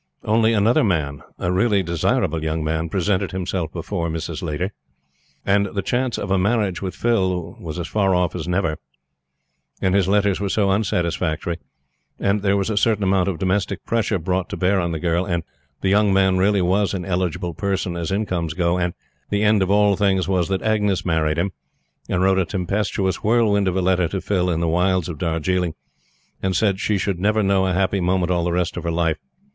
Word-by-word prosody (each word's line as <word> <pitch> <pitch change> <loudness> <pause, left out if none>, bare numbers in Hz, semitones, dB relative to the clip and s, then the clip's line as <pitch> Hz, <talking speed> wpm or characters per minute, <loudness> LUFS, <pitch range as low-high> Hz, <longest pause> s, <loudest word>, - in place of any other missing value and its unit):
Only, 110 +1 +3
another 110 +3 +3
man 75 -8 -1 0.2
a 90 - -1
really 100 +1 +2
desirable 80 -1 0
young 80 0 -1
man 80 +1 -1
presented 95 +1 0
himself 90 -3 -2
before 85 0 -3
Mrs. 80 +1 -4
Laiter; 85 +3 -2 0.7
and 100 0 +3
the 100 - -1
chance 125 +3 -1
of 95 - -4
a 95 - +3
marriage 100 -2 0
with 95 -2 -4
Phil 95 -7 0
was 80 -2 -6
as 90 - -3
far 95 -3 +1
off 90 -1 +1
as - - -4
ever; 90 -4 0 1.0
and 95 - +1
his 100 -2 +3
letters 100 -1 +2
were 100 -1 -2
so 100 -1 +2
unsatisfactory; 85 -4 -1 0.6
and 100 +1 +1
there 100 0 +2
was 100 +2 -1
a 105 - -2
certain 105 -1 +2
amount 95 -1 +2
of 90 - -3
domestic 95 0 -1
pressure 115 -3 0
brought 90 +2 -2
to - - -5
bear 95 +1 +2
on 85 -1 -1
the 80 - -2
girl; 85 +1 +1
and 85 -3 -2 0.4
the 95 - +1
young 105 +1 +4
man 95 -1 +3
really 95 +1 +2
was 100 +3 +1
an 90 -2 -4
eligible 90 -1 -2
person 95 0 -2
as 85 +1 -3
incomes 90 -6 -1
go; 90 0 +1
and 90 -1 -1 0.3
the 105 0 0
end 105 -1 +4
of 95 - +1
all 100 0 +4
things 95 -2 +1
was 90 -3 +1
that 95 -1 -2
Agnes 105 -3 +1
married 80 -2 +1
him, 95 +3 0 0.6
and 90 0 +1
wrote 95 0 +3
a 95 - +1
tempestuous 95 0 -1
whirlwind 105 -3 +2
of 95 - 0
a 95 - +1
letter 90 -1 +2
to 95 - -3
Phil 90 -2 0
in 85 -1 0
the 85 - 0
wilds 90 +1 +1
of 80 -4 -6
Darjiling, 85 0 -1 0.7
and 95 -1 0
said 100 -4 +1
she 105 0 +1
should 95 -2 -2
never 105 +3 +2
know 95 -1 +2
a 95 - 0
happy 95 +1 +1
moment 90 0 +1
all 85 -1 +1
the 90 - 0
rest 90 0 -1
of - - -4
her 85 - -2
life. 80 -1 0
95 Hz, 205 wpm, -21 LUFS, 85-100 Hz, 1.0 s, young